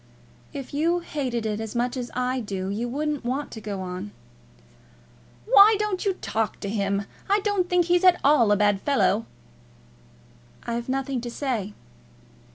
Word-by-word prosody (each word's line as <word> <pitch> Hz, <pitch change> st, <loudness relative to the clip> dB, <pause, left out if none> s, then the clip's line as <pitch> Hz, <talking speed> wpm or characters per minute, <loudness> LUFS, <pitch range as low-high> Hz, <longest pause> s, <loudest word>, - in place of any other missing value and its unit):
"If 275 Hz, -1 st, -7 dB
you 335 Hz, +4 st, +1 dB
hated 255 Hz, -8 st, -3 dB
it 210 Hz, -1 st, -2 dB
as 220 Hz, +1 st, -6 dB
much 245 Hz, +1 st, 0 dB
as 245 Hz, -2 st, -4 dB
I 250 Hz, +1 st, 0 dB
do, 195 Hz, -4 st, -4 dB
you 225 Hz, +5 st, -2 dB
wouldn't 295 Hz, +2 st, -2 dB
want 265 Hz, +4 st, -3 dB
to 220 Hz, -, -8 dB
go 200 Hz, -3 st, -4 dB
on." 185 Hz, +2 st, -5 dB, 1.4 s
"Why 435 Hz, -2 st, +7 dB
don't 415 Hz, -3 st, -1 dB
you 390 Hz, -, +2 dB
talk 220 Hz, -, -2 dB
to 200 Hz, -, -3 dB
him? 200 Hz, -1 st, 0 dB, 0.3 s
I 405 Hz, +1 st, +4 dB
don't 395 Hz, -3 st, 0 dB
think 360 Hz, -1 st, +3 dB
he's 355 Hz, +1 st, +2 dB
at 365 Hz, -1 st, +6 dB
all 270 Hz, -7 st, +5 dB
a 205 Hz, -, +4 dB
bad 205 Hz, -1 st, +2 dB
fellow." 230 Hz, -6 st, +1 dB, 1.4 s
"I've 235 Hz, +1 st, -4 dB
nothing 265 Hz, -1 st, -1 dB
to 240 Hz, -, -5 dB
say." 235 Hz, -6 st, -3 dB
250 Hz, 165 wpm, -25 LUFS, 210-305 Hz, 1.4 s, Why